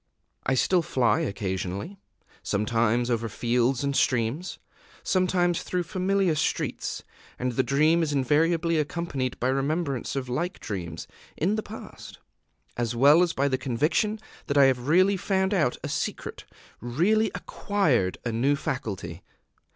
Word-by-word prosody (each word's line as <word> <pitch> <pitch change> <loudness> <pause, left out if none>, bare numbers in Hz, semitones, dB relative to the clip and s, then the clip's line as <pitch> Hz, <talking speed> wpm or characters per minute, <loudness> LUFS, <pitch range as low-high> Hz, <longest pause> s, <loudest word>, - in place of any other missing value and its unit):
I 135 - +3
still 180 +7 +3
fly 120 -8 +1
occasionally, 100 - -3 0.4
sometimes 115 +3 +1
over 115 -1 -1
fields 120 +4 0
and 140 0 -1
streams, 130 +6 0 0.5
sometimes 180 -2 +1
through 180 -1 -2
familiar 185 +1 +1
streets; 155 0 -2 0.3
and 125 0 -1
the 125 - +1
dream 155 +6 +3
is 160 -2 0
invariably 160 +4 +2
accompanied 150 -5 -3
by 125 - +1
remembrance 140 0 -1
of 135 -2 -3
like 170 +10 -3
dreams 85 -6 -5 0.3
in 180 +7 +1
the 215 - -1
past, 215 +1 -10 0.6
as 120 -1 -2
well 145 +7 +6
as 175 -2 +2
by 140 +1 +1
the 130 -2 0
conviction 155 - 0 0.3
that 140 - 0
I 140 - +8
have 130 -1 +1
really 185 +5 +4
found 190 +1 0
out 155 -10 +1
a - - -2
secret, - - -4 0.3
really 185 - +1
acquired 150 - 0
a 120 - 0
new 130 +6 +2
faculty. 100 - -4
140 Hz, 140 wpm, -26 LUFS, 120-175 Hz, 0.6 s, I